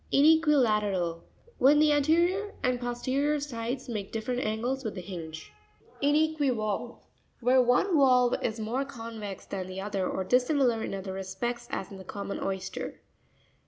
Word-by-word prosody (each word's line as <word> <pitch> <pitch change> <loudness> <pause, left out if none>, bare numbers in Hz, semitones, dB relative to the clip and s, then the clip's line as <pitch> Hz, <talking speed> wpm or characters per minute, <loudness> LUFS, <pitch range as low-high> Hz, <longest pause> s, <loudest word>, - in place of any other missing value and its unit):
Ine'QuiLaATERAL.— 220 - +3 0.4
When 280 +4 +6
the 305 0 +5
anterior 340 +8 +2
and 250 -1 +1
posterior 260 +5 0
sides 250 -2 -4
make 210 -5 -4
different 235 +3 -2
angles 240 +5 -2
with 220 -3 -4
the 185 - -5
hinge. 165 -3 -8 0.5
Inr'quivaLvE.—Where 265 -4 0
one 250 +10 +3
valve 250 -4 +5
is 225 0 -2
more 230 +5 -1
convex 225 -7 -7
than 185 -2 -5
the 185 0 -6
other, 195 -2 -2
or 190 - -2
dis 250 +6 +3
similar 255 -7 +2
in - - -3
other 190 0 -5
respects, 195 +6 -4
as 190 - -4
in 195 - -8
the 190 - -9
common 200 +2 -5
oyster. 190 -1 -4
240 Hz, 145 wpm, -28 LUFS, 200-275 Hz, 0.5 s, When